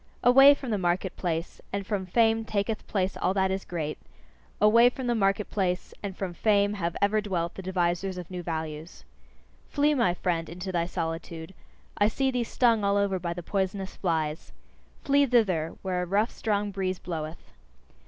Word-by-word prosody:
Away 270 +3 +8
from 265 -4 -6
the 210 - 0
market 180 +1 0
place 165 -1 -3
and 200 0 -3
from 195 -2 -2
fame 225 +3 +3
taketh 215 0 -2
place 190 -2 -1
all 185 - 0
that 190 -1 +2
is 190 0 -2
great: 155 -3 -4 0.6
away 230 +4 +6
from 255 +1 -6
the 240 - +1
market 195 -2 +1
place 185 -3 -1
and 195 -2 -5
from 190 -3 -3
fame 205 +2 +2
have 170 -4 -3
ever 210 +1 +3
dwelt 175 -5 -2
the - - -7
devisers 180 0 -1
of 180 0 -8
new 180 -1 -4
values. 160 -1 -5 0.7
Flee, 295 +1 +2
my 215 -11 +2
friend, 170 -3 -1
into 180 +3 -5
thy 170 -2 0
solitude: 165 0 -5 0.5
I 205 - +5
see 265 +4 0
thee 250 -1 0
stung 230 -2 +2
all 200 0 +2
over 200 -2 +1
by 170 -1 -3
the 175 - -6
poisonous 190 +1 -2
flies. 160 -4 -2 0.5
Flee 280 0 +4
thither, 190 -10 +2
where 185 -2 -1
a 180 - -3
rough, 205 +5 +1
strong 205 -2 -1
breeze 190 -1 -2
bloweth! 160 -3 -6
190 Hz, 180 wpm, -27 LUFS, 175-210 Hz, 0.7 s, Away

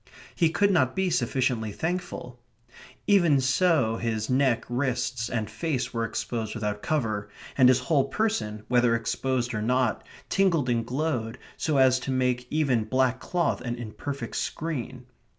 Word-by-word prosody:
He 165 -3 +2
could 200 +5 +2
not 130 -9 +2
be 190 -1 0
sufficiently 125 -9 0
thankful. 160 - -4 0.7
Even 175 -8 +4
so 130 -4 +2
his 110 0 -2
neck, 130 -3 +2
wrists, 125 -2 -1
and 110 -3 -2
face 125 +6 -3
were 115 -1 -1
exposed 115 -1 -3
without 105 -2 -3
cover, 110 -9 -1 0.3
and 130 -2 +6
his 130 0 +4
whole 135 +1 +2
person, 135 - -2
whether 120 -1 +3
exposed 120 +1 -1
or 105 - -2
not, 125 +1 +1 0.2
tingled 175 -9 +2
and 115 -1 +1
glowed 125 -3 -2 0.2
so 155 -3 0
as 130 -1 +5
to 130 - -6
make 125 -1 0
even 135 -8 +1
black 130 0 +1
cloth 175 +3 -1
an 120 -1 -3
imperfect 120 +2 -6
screen. 130 -5 -4
125 Hz, 150 wpm, -26 LUFS, 115-150 Hz, 0.7 s, and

